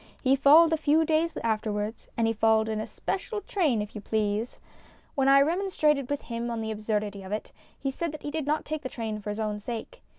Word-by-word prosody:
He 265 0 +5
followed 310 +4 +7
a - - +3
few 310 +1 +3
days 320 +1 +1
afterwards, 215 -1 -2
and 230 - +2
he 225 - +2
followed 220 0 +3
in 215 -1 -1
a - - -5
special 415 +3 -3
train 295 - +1
if 210 - -10
you 210 - -6
please. 215 +2 -1 0.5
When 270 -1 +1
I 275 0 +7
remonstrated 310 -5 +1
with 285 -1 -2
him 235 0 -4
on 230 -1 -3
the 220 0 -3
absurdity 210 -2 -2
of 190 0 -9
it, 215 - -4 0.3
he 270 - -2
said 335 +4 -3
that 305 - -8
he 290 - -4
did 310 -2 -3
not 305 +1 0
take 310 0 -3
the 260 - -5
train 220 -3 -4
for 210 - -6
his 210 +1 -3
own 210 -1 -2
sake. 235 - -6
235 Hz, 230 wpm, -27 LUFS, 215-300 Hz, 0.5 s, followed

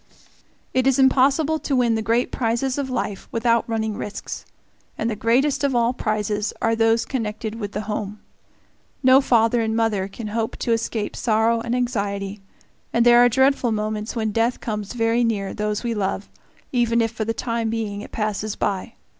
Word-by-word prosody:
It 255 0 +2
is 270 - +3
impossible 275 +4 +3
to 280 - -1
win 245 -2 +3
the 220 - 0
great 230 +3 +1
prizes 250 +3 -1
of 275 -2 -2
life 220 -6 -3
without 230 0 +1
running 220 -1 -1
risks, 205 - -6 0.5
and 220 - -1
the - - -2
greatest 250 +8 +2
of 275 -3 +1
all 240 +1 +2
prizes 210 -2 -1
are 225 0 +1
those 225 0 +2
connected 220 -2 -4
with 205 -2 -5
the 210 - -2
home. 210 -1 -4 0.8
No 260 +1 +7
father 235 -2 +3
and 220 0 -1
mother 220 -4 +1
can 215 +2 -7
hope 225 +1 -2
to 235 - -2
escape 225 -2 -1
sorrow 230 0 +2
and 235 +1 -2
anxiety, 200 -5 -2 0.5
and 235 0 +2
there 240 0 +7
are 245 0 +7
dreadful 265 0 +2
moments 215 +1 -2
when 220 -2 -1
death 230 +3 +1
comes 210 -2 -4
very 230 0 +2
near 205 -4 -1
those 210 +1 -2
we 235 -1 -1
love, 200 -1 -2 0.4
even 235 -2 +2
if 225 -1 +1
for 225 -1 -3
the 225 - -1
time 230 0 -2
being 215 -3 -3
it - - -10
passes 215 -1 -2
by. 200 +4 -2
225 Hz, 180 wpm, -22 LUFS, 215-240 Hz, 0.8 s, No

